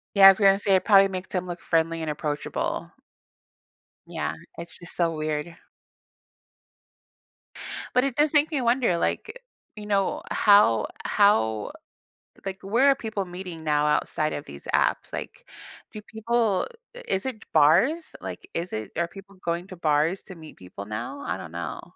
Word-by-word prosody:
Yeah, 195 -1 +9
I - - +14
was 195 - +6
gonna 195 -2 +5
say 200 -1 +2
it 185 - 0
probably 195 -2 +6
makes 185 -1 -6
him 180 0 -1
look 175 -1 -6
friendly 165 0 0
and 160 -1 -3
approachable. 150 0 -3 1.2
Yeah, - - -3 0.2
it's 170 0 -8
just 175 - -9
so 170 -2 +1
weird. 155 +2 -3 2.4
But 250 +1 +4
it 275 -2 -2
does 295 +1 +3
make 300 +1 +4
me 295 -4 -1
wonder, 235 -7 +2
like, 475 - -2 0.3
you 210 -1 -8
know, 195 -2 0
how 200 - +5 0.2
how 110 - +2 0.7
like, 195 0 -4
where 235 +8 +3
are 275 - +5
people 220 -5 -4
meeting 180 -2 -8
now 150 -1 +2
outside 155 +1 0
of 145 - -5
these 70 0 -11
apps? - - +1
Like, - - -7 0.5
do 215 - -8
people 220 -1 0 0.4
is 190 +4 -1
it 245 -4 -5
bars? 190 - +3
Like, 370 - -8
is 175 +2 -3
it 110 -1 -4
are 170 0 +1
people 195 +1 -13
going 170 +2 -2
to 185 - -9
bars 160 +2 +1
to 185 - -11
meet 160 -2 -13
people 95 +2 -9
now? 110 - -5
I - - -3
don't - - -9
know. - - -5
185 Hz, 165 wpm, -25 LUFS, 160-215 Hz, 2.4 s, I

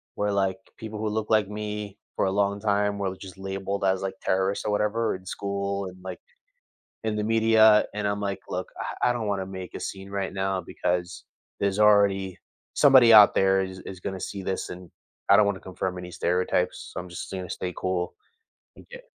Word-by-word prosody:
where, 105 0 0
like, 95 -1 +1 0.2
people 110 -1 -7
who 110 0 -1
look 110 0 -2
like 110 -3 +3
me 105 -1 -5 0.2
for - - +1
a 95 - +1
long 100 +1 0
time 105 -1 +1
were 100 -1 -1
l 95 - -3
just 95 0 -11
labeled 95 +1 -4
as, 95 -1 +2
like, 95 0 -3
terrorists 95 +1 0
or 105 - 0
whatever 105 +2 0
in 95 0 -11
school, 100 +1 -3
and, 90 0 -10
like, 95 - -6 0.9
in 110 -1 0
the 105 - -1
media, 110 -1 +5
and 105 0 -2
I'm 100 0 -2
like, 100 -1 -3
"Look, - - -3
I 125 - 0
I - - +3
don't 120 -3 -3
wanna 100 -2 -1
make 95 -1 -8
a - - -5
scene 95 0 -6
right 100 -1 -3
now 95 0 -1
because 90 +1 -3 0.4
there's 100 0 0
already 100 -3 +4 0.4
somebody 130 -5 +7
out 105 -2 +9
there 95 0 +3
is 95 0 -6
is 95 -1 -9
gonna 95 0 -4
see 100 +2 -5
this 95 0 -3
and 90 -1 -9 0.4
I - - +9
don't 105 - +5
wanna 100 -2 -1
confirm 90 0 -4
any 90 0 -7
stereotypes, 90 +1 -1
so - - -6
I'm 90 - -9
just 85 - -7
gonna 95 -2 -5
stay 90 -1 -4
cool." 90 -1 -2 0.6
And - - -16
get - - -11
100 Hz, 205 wpm, -26 LUFS, 95-105 Hz, 0.9 s, out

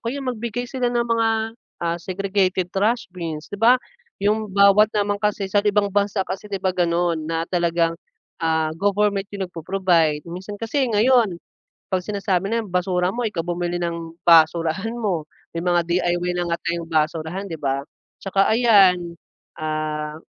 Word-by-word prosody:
kaya 270 +4 -4
magbigay 240 -1 -3
sila 245 -1 -1
ng 240 -1 0
mga, 230 -1 +1 0.6
ah, 170 0 0
segregated 190 0 -1
trash 220 +5 +1
bins 165 -3 -6
'di 205 - -6
ba, 245 +3 +6 0.4
yung 210 +1 0
bawat 200 +2 +5
naman 205 0 0
kasi 210 -1 0
sa 200 +1 +2
ibang 205 -1 +1
bansa 200 -1 +1
kasi 195 +2 -6
'di 200 - -2
ba 190 -1 -1
ganun 170 -2 +1
na 165 0 -1
talagang, 170 -1 +1 0.5
ah, 160 -1 +1
government 200 +1 +1
yung 195 -1 -3
nagpo-provide. 170 -3 +1
Minsan 190 +4 -7
kasi 265 +5 0
ngayon 225 -3 +3 0.5
kapag 185 -1 -1
sinasabi 195 -2 0
na 230 - +2
basura 180 -1 0
mo 240 0 -3
ikaw 185 -5 -4
bumili 175 0 -2
ng 170 -1 -4
basurahan 165 +5 +4
mo 190 -9 -1 0.3
may - - -1
mga 175 -1 +3
DIY 175 0 0
na 175 -1 -1
nga - - +2
tayong 170 -1 -2
basurahan 160 +4 -1
'di 165 - -5
ba 135 -1 0
at - - -36 0.3
saka 195 0 +2
ayan, 190 -7 +4 0.4
ah, 155 -1 -3
185 Hz, 160 wpm, -22 LUFS, 170-205 Hz, 0.6 s, ba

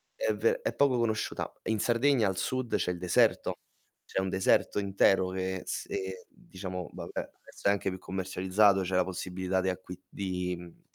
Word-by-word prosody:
è - - 0
ve 485 +2 +1
è - - -1
poco 140 -3 +4
conosciuta. 110 -2 -1
In 110 -1 0
Sardegna 120 -1 +3
al 95 -1 -1
sud 130 +4 -1
c'è 90 - +1
il 90 - -4
deserto, 90 -1 +2 0.5
c'è - - -2
un 95 - -1
deserto 95 +2 +2
intero 95 -1 +3
che 95 0 -3
se 95 -1 -4
diciamo, 90 -2 -7
vabbè, - - -8
adesso - - -6
è - - +6
anche 100 -1 0
più 95 - -5
commercializzato, 95 +1 +2
c'è 95 0 -1
la 90 - +4
possibilità 95 0 -2
di 95 - +1
acqui 90 0 -6
di 90 -2 -2
mhmm, 85 -1 -13
95 Hz, 175 wpm, -30 LUFS, 90-105 Hz, 0.5 s, è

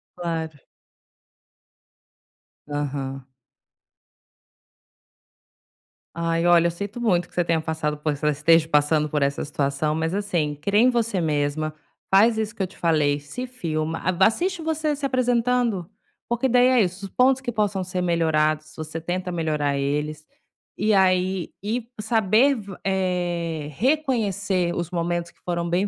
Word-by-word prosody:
Claro. 160 -3 -4 2.1
Aham. 140 -2 -4 2.9
Ai, 165 0 0
olha, 170 -1 +6
eu - - -1
sinto 200 +7 -6
muito 180 -7 +1
que - - -23
você 175 - +2
tenha 165 -1 +1
passado 155 -1 -2
por 150 +1 -1
es 145 - -10
esteja 155 +2 +3
passando 150 0 +2
por 150 0 -1
essa 140 0 0
situação, 145 +1 -1
mas, 160 +2 -1
assim, 175 -7 -1
crê 200 +8 +1
em 245 +3 +6
você 230 -6 0
mesma, 155 0 -1 0.4
faz 220 +4 +5
isso 220 +1 -2
que 200 - -2
eu - - -2
te 185 - -18
falei, 150 -4 +2
se 145 - -6
filma, 165 -10 -3
a 185 +1 +2
assiste 345 - 0
você 315 -1 0
se 280 0 -4
apresentando, 245 -6 +1 0.4
porque 240 +2 0
daí 250 +1 +5
é 255 -2 +4
isso, 190 0 -2
os 195 - -9
pontos 260 +1 +3
que 245 - -2
possam 205 -4 0
ser 185 0 -3
melhorados, 155 -3 +1
você 155 +1 -6
tenta 180 +2 -3
melhorar 150 -4 0
eles, 150 +2 -2 0.5
e 215 +2 +1
aí 185 -1 +2
e 225 +3 -3
saber 220 +5 +3
v 200 -5 -8
eh, 175 -5 -1
reconhecer 205 - 0
os 175 -1 -3
momentos 170 -1 -2
que - - -26
foram 170 -1 -2
bem 185 +4 +1
175 Hz, 145 wpm, -24 LUFS, 155-215 Hz, 2.9 s, olha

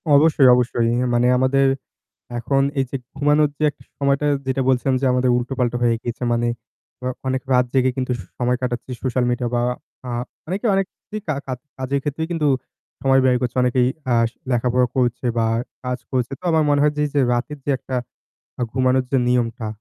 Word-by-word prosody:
অবশ্যই, 145 -3 +5
অবশ্যই। 120 -1 +1
ইয়ে 125 +1 +1
মানে 120 +1 +3
আমাদের 135 +1 +3 0.7
এখন 135 +4 +1 0.2
এই 135 - +2
যে - - -5 0.2
ঘুমানোর 145 +1 +3
যে - - 0
একটা - - -21 0.2
সময়টা 140 +1 +1 0.2
যেটা 130 0 0
বলছিলাম 130 +1 +2
যে - - +1
আমাদের 125 0 +2
উল্টোপাল্টা 125 -1 -1
হয়ে 115 -1 +3
গিয়েছে 120 +1 -4
মানে 120 0 +1 0.6
আ - - 0 0.2
অনেক 130 0 0
রাত 125 0 +4
জেগে 130 -1 +3
কিন্তু 130 -1 -1
সু 90 - -9
সময় 125 0 +1
কাটাচ্ছি 125 0 -3
সোশ্যাল 125 -1 +1
মিডিয়া 120 0 -1
বা 120 - +2 0.5
আহ 120 0 -2 0.3
অনেকে 195 +6 -3
অনেক 195 0 +2 0.2
কি 215 - -4
কা 155 - 0
কা 130 - -2 0.2
কাজের 135 +2 -1
ক্ষেত্রেই 155 +3 -2
কিন্তু 155 -3 +1 0.5
সময় 135 0 +4
ব্যয় 125 -1 +4
করছে 125 0 -2
অনেকেই 125 0 +3 0.2
আ - - +4 0.4
লেখাপড়া 125 +1 +2
করছে 125 0 0
বা 115 - +3 0.4
কাজ 125 0 -2
করছে। 125 -1 0
তো - - -27
আমার 160 -1 +3
মনে 145 0 +3
হয় 150 0 +3
যে, 150 - +2
যে 145 - +2
রাতের 135 +5 -2
যে - - -3
একটা 130 - -5 0.8
ঘুমানোর 130 0 +2
যে 135 - +3
নিয়মটা। 120 -2 0
130 Hz, 190 wpm, -21 LUFS, 125-140 Hz, 0.8 s, অবশ্যই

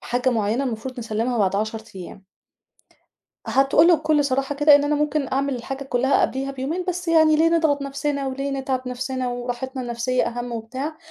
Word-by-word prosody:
حاجة 250 +1 0
مُعينة 225 +3 0
المفروض 250 +2 -5
نسلّمها 230 +1 -2
بعد 195 -1 +2
10 220 +1 -2
أيام. 185 +1 -10 1.2
هتقول 270 +7 +4
له 345 - +7
بكُل 305 -2 +1
صراحة 275 +1 -1
كده 295 +1 +6
إن 285 0 +4
أنا 300 +1 +1
ممكن 295 -2 0
أعمل 275 0 0
الحاجة 270 +3 -6
كلّها 265 +1 +1
قبليها 270 +1 -1
بيومين، 275 +7 -3
بس 355 0 -3
يعني 315 -2 +5
ليه 325 +2 +4
نضغط 315 -4 +2
نفسنا 280 0 -2
وليه 275 +1 -3
نتعِب 265 -2 -2
نفسنا؟ 255 0 -3
وراحِتنا 245 +2 -4
النفسية 240 +1 -1
أهم 240 0 -4
وبتاع، 260 +7 -5
265 Hz, 175 wpm, -22 LUFS, 245-290 Hz, 1.2 s, له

